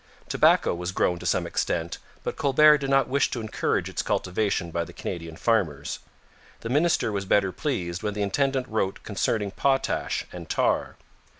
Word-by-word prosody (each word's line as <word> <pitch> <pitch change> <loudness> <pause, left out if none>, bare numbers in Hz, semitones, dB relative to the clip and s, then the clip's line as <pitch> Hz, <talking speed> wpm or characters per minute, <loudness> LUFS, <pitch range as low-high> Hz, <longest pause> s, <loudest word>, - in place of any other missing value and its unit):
Tobacco - - +4
was 90 +1 -4
grown 90 -1 +1
to - - -5
some - - +1
extent, 85 0 -2 0.2
but - - -3
Colbert 150 +1 +5
did 135 -1 -3
not 135 0 +3
wish 140 +2 +2
to 120 - -3
encourage 110 -1 -1
its - - -2
cultivation 90 -2 -1
by 85 +1 -1
the - - -11
Canadian 85 -2 -6
farmers. 80 - 0 0.6
The 115 - -5
minister 150 -3 +2
was 100 -1 -2
better 95 0 +2
pleased 90 - -3
when 105 -1 -2
the 105 - -1
intendant 135 +5 0
wrote 110 -4 -2
concerning 105 0 -1
potash 135 +5 0
and 85 -2 -8
tar. - - +1
105 Hz, 170 wpm, -26 LUFS, 90-135 Hz, 0.6 s, Colbert